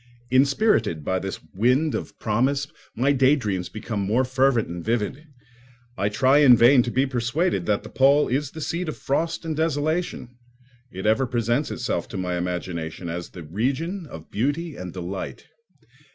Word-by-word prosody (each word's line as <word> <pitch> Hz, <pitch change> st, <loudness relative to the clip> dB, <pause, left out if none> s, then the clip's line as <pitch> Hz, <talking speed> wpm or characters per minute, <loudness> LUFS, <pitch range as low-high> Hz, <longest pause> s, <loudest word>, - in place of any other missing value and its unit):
Inspirited 130 Hz, -, +2 dB
by 95 Hz, 0 st, 0 dB
this 95 Hz, +1 st, -5 dB
wind 125 Hz, +9 st, +2 dB
of -, -, -5 dB
promise, 130 Hz, +6 st, +1 dB, 0.3 s
my 130 Hz, +5 st, +2 dB
daydreams 130 Hz, -9 st, +2 dB
become 110 Hz, -1 st, -5 dB
more 105 Hz, +6 st, +1 dB
fervent 130 Hz, -2 st, +2 dB
and 85 Hz, 0 st, -6 dB
vivid. 120 Hz, +7 st, -2 dB, 0.7 s
I 100 Hz, +2 st, 0 dB
try 130 Hz, +7 st, +4 dB
in 130 Hz, -5 st, +7 dB
vain 125 Hz, +3 st, +6 dB
to 120 Hz, -, -2 dB
be 130 Hz, +3 st, +2 dB
persuaded 125 Hz, -, -1 dB
that 105 Hz, -1 st, +1 dB
the -, -, -9 dB
pole 140 Hz, +2 st, +4 dB
is 140 Hz, +2 st, -1 dB
the 160 Hz, +2 st, -9 dB
seat 170 Hz, +2 st, -2 dB
of -, -, -5 dB
frost 165 Hz, +4 st, -1 dB
and 160 Hz, -1 st, -2 dB
desolation; 155 Hz, -2 st, -1 dB, 0.6 s
it 95 Hz, +2 st, -6 dB
ever 110 Hz, +5 st, +3 dB
presents 120 Hz, +3 st, 0 dB
itself -, -, -2 dB
to -, -, -7 dB
my 90 Hz, -1 st, -2 dB
imagination 90 Hz, -1 st, -4 dB
as 85 Hz, +1 st, -5 dB
the 90 Hz, -, -10 dB
region 135 Hz, -, -2 dB
of 80 Hz, -, -11 dB
beauty 145 Hz, +8 st, -1 dB
and 90 Hz, -1 st, -7 dB
delight. 90 Hz, +2 st, -6 dB
125 Hz, 165 wpm, -24 LUFS, 100-145 Hz, 0.7 s, in